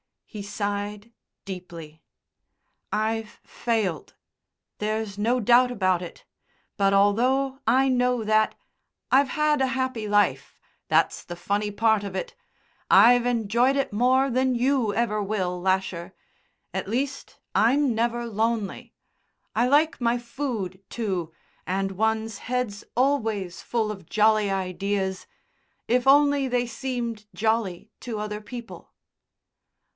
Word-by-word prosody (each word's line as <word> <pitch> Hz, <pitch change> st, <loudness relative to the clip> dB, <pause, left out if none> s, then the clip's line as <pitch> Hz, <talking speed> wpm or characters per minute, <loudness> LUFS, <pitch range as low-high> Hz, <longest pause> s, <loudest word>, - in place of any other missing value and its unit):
He 210 Hz, -, -8 dB
sighed 205 Hz, +1 st, -4 dB, 0.3 s
deeply. 170 Hz, -5 st, -9 dB, 0.9 s
"I've 220 Hz, +1 st, -2 dB
failed. 210 Hz, -, -2 dB, 0.6 s
There's 215 Hz, -1 st, -2 dB
no 235 Hz, +4 st, +1 dB
doubt 245 Hz, +3 st, +5 dB
about 185 Hz, -6 st, +1 dB
it. 175 Hz, -, -9 dB, 0.5 s
But, 195 Hz, -1 st, +3 dB
although 255 Hz, +7 st, +2 dB
I 265 Hz, +4 st, +4 dB
know 250 Hz, -2 st, +1 dB
that, 215 Hz, 0 st, +2 dB, 0.6 s
I've 275 Hz, +2 st, +5 dB
had 300 Hz, +1 st, +1 dB
a 265 Hz, -, +3 dB
happy 260 Hz, -4 st, -2 dB
life. 200 Hz, -11 st, +1 dB, 0.3 s
That's -, -, +2 dB
the 175 Hz, -, -7 dB
funny 205 Hz, +4 st, -1 dB
part 215 Hz, 0 st, +2 dB
of 195 Hz, -1 st, -6 dB
it. 190 Hz, -, -4 dB, 0.6 s
I've 245 Hz, +1 st, +7 dB
enjoyed 240 Hz, +2 st, +2 dB
it 275 Hz, -1 st, 0 dB
more 255 Hz, +4 st, +3 dB
than 255 Hz, +1 st, +1 dB
you 245 Hz, -3 st, +1 dB
ever 220 Hz, -2 st, 0 dB
will, 190 Hz, -3 st, -2 dB
Lasher. 185 Hz, -2 st, -1 dB, 0.6 s
At -, -, -3 dB
least, 260 Hz, +6 st, -3 dB, 0.2 s
I'm 260 Hz, +3 st, +3 dB
never 235 Hz, +1 st, -1 dB
lonely. 225 Hz, -2 st, -2 dB, 0.6 s
I 240 Hz, +3 st, +2 dB
like 300 Hz, +4 st, +3 dB
my 235 Hz, 0 st, +2 dB
food, 235 Hz, -7 st, -4 dB
too, 185 Hz, -8 st, -3 dB, 0.4 s
and 195 Hz, +1 st, -1 dB
one's 220 Hz, +2 st, -1 dB
head's 245 Hz, -5 st, -2 dB
always 225 Hz, -9 st, 0 dB
full 225 Hz, -3 st, -1 dB
of 190 Hz, -5 st, -10 dB
jolly 215 Hz, -1 st, +3 dB
ideas, 190 Hz, 0 st, -2 dB, 0.6 s
if 250 Hz, +2 st, +1 dB
only 285 Hz, 0 st, +5 dB
they 245 Hz, -1 st, 0 dB
seemed 235 Hz, -3 st, -4 dB
jolly 220 Hz, -5 st, -1 dB
to 235 Hz, -3 st, -5 dB
other 210 Hz, 0 st, -4 dB
people." 240 Hz, +1 st, -10 dB
220 Hz, 120 wpm, -25 LUFS, 200-245 Hz, 0.9 s, I've